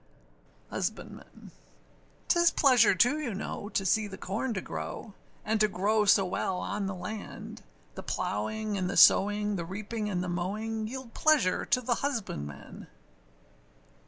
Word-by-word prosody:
HUSBANDMAN. -, -, -6 dB, 0.8 s
âTis 345 Hz, -1 st, +3 dB
pleasure, 250 Hz, -8 st, +5 dB
too, 245 Hz, -, +3 dB
you 245 Hz, -9 st, -3 dB
know, 205 Hz, +1 st, -5 dB
to 195 Hz, -, -1 dB
see 215 Hz, +3 st, +2 dB
the 190 Hz, -1 st, -9 dB
corn 225 Hz, +7 st, -3 dB
to -, -, -1 dB
grow, 205 Hz, +2 st, -6 dB, 0.3 s
And 220 Hz, 0 st, +1 dB
to 215 Hz, -, +4 dB
grow 210 Hz, +2 st, +1 dB
so 195 Hz, -1 st, +5 dB
well 180 Hz, 0 st, -2 dB
on 200 Hz, +1 st, -3 dB
the 195 Hz, -, -4 dB
land; 200 Hz, +4 st, -7 dB, 0.3 s
The -, -, -7 dB
plowing 210 Hz, -, -2 dB
and 180 Hz, -1 st, -1 dB
the -, -, -2 dB
sowing, 205 Hz, 0 st, +5 dB
the 170 Hz, -, -3 dB
reaping 210 Hz, +4 st, -4 dB
and 180 Hz, -3 st, -1 dB
the -, -, -4 dB
mowing, 215 Hz, +5 st, -3 dB
Yield 255 Hz, 0 st, -8 dB
pleasure 300 Hz, -13 st, +2 dB
to 250 Hz, -, +2 dB
the 240 Hz, -1 st, 0 dB
husbandman. 75 Hz, -, -5 dB
210 Hz, 150 wpm, -29 LUFS, 190-225 Hz, 0.8 s, pleasure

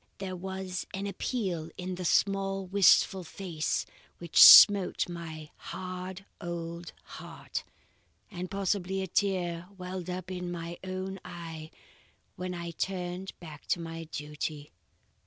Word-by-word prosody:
There 190 Hz, -1 st, -5 dB
was 190 Hz, 0 st, -5 dB
an 195 Hz, +1 st, -3 dB
appeal 190 Hz, -5 st, -2 dB
in 185 Hz, 0 st, -4 dB
the 180 Hz, 0 st, -5 dB
small 195 Hz, +1 st, +1 dB
wistful 190 Hz, 0 st, +4 dB
face 170 Hz, -3 st, -2 dB, 0.3 s
which 170 Hz, -2 st, +3 dB
smote 200 Hz, -3 st, +10 dB
my 160 Hz, -3 st, -7 dB
hard 185 Hz, +1 st, -7 dB, 0.2 s
old 170 Hz, 0 st, -5 dB
heart, -, -, -7 dB, 0.7 s
and 180 Hz, -1 st, -5 dB
possibly 195 Hz, -1 st, -1 dB
a -, -, -4 dB
tear 175 Hz, -2 st, 0 dB
welled 180 Hz, -1 st, -6 dB
up 185 Hz, +1 st, -5 dB
in 180 Hz, -1 st, -4 dB
my 170 Hz, 0 st, -6 dB
own 190 Hz, +1 st, -4 dB
eye 160 Hz, -2 st, -8 dB, 0.7 s
when 180 Hz, 0 st, -4 dB
I 170 Hz, 0 st, -5 dB
turned 180 Hz, +1 st, -4 dB
back 155 Hz, -4 st, -11 dB
to -, -, +1 dB
my 165 Hz, 0 st, -6 dB
duty." 150 Hz, -1 st, -5 dB
180 Hz, 125 wpm, -30 LUFS, 170-190 Hz, 0.7 s, smote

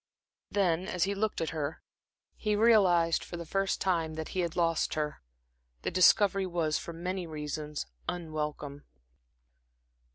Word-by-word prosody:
Then, 185 Hz, -2 st, +1 dB
as 180 Hz, -2 st, 0 dB
he 200 Hz, +2 st, +1 dB
looked 210 Hz, -1 st, -1 dB
at 165 Hz, -, -1 dB
her, 155 Hz, -1 st, -4 dB, 0.5 s
he 210 Hz, -1 st, 0 dB
realized 190 Hz, -7 st, +4 dB
for 175 Hz, -, -7 dB
the 170 Hz, -, -6 dB
first 195 Hz, +4 st, 0 dB
time 165 Hz, -4 st, 0 dB
that 160 Hz, 0 st, -5 dB
he 185 Hz, -, -3 dB
had 170 Hz, -2 st, -1 dB
lost 165 Hz, -2 st, +1 dB
her. 150 Hz, -1 st, -2 dB, 0.6 s
The -, -, -1 dB
discovery 195 Hz, +2 st, +5 dB
was, 165 Hz, -3 st, 0 dB
for -, -, -7 dB
many 180 Hz, +2 st, -4 dB
reasons, 150 Hz, -1 st, -4 dB, 0.2 s
unwelcome. 150 Hz, -4 st, -4 dB
170 Hz, 140 wpm, -30 LUFS, 155-190 Hz, 0.6 s, discovery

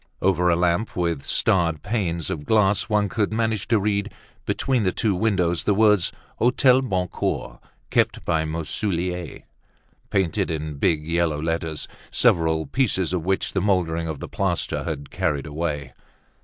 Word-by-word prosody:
Over 90 Hz, -2 st, +2 dB
a 85 Hz, -, +4 dB
lamp 90 Hz, +5 st, 0 dB
with 85 Hz, -5 st, 0 dB
starred 85 Hz, -5 st, +1 dB
panes 90 Hz, -, -2 dB
of 75 Hz, -, -4 dB
glass, 105 Hz, +1 st, +2 dB
one 105 Hz, -1 st, +2 dB
could 110 Hz, -1 st, -1 dB
manage 110 Hz, -3 st, -1 dB
to 115 Hz, -2 st, +3 dB
read, 100 Hz, 0 st, -1 dB, 0.4 s
between 130 Hz, -3 st, +1 dB
the 95 Hz, -3 st, +2 dB
two 110 Hz, 0 st, 0 dB
windows, 90 Hz, -4 st, +1 dB
the 100 Hz, -, +3 dB
words, 105 Hz, -3 st, +4 dB, 0.3 s
"Hotel 125 Hz, +2 st, +4 dB
Boncoeur, 90 Hz, -, -2 dB, 0.3 s
kept -, -, +1 dB
by 80 Hz, -1 st, +1 dB
Marsoullier," 85 Hz, +2 st, -3 dB, 0.7 s
painted 95 Hz, +1 st, 0 dB
in 75 Hz, -2 st, -4 dB
big 75 Hz, 0 st, +1 dB
yellow 85 Hz, -3 st, +1 dB
letters, 80 Hz, -1 st, -2 dB, 0.2 s
several 80 Hz, -1 st, +2 dB
pieces 95 Hz, -9 st, 0 dB
of 90 Hz, -3 st, -1 dB
which 95 Hz, 0 st, 0 dB
the 95 Hz, -, +1 dB
moldering 85 Hz, -4 st, +1 dB
of 80 Hz, -3 st, -4 dB
the -, -, -6 dB
plaster 95 Hz, -3 st, -1 dB
had 70 Hz, -4 st, -5 dB
carried 70 Hz, -2 st, -1 dB
away. 75 Hz, -3 st, -3 dB
90 Hz, 150 wpm, -23 LUFS, 80-105 Hz, 0.7 s, a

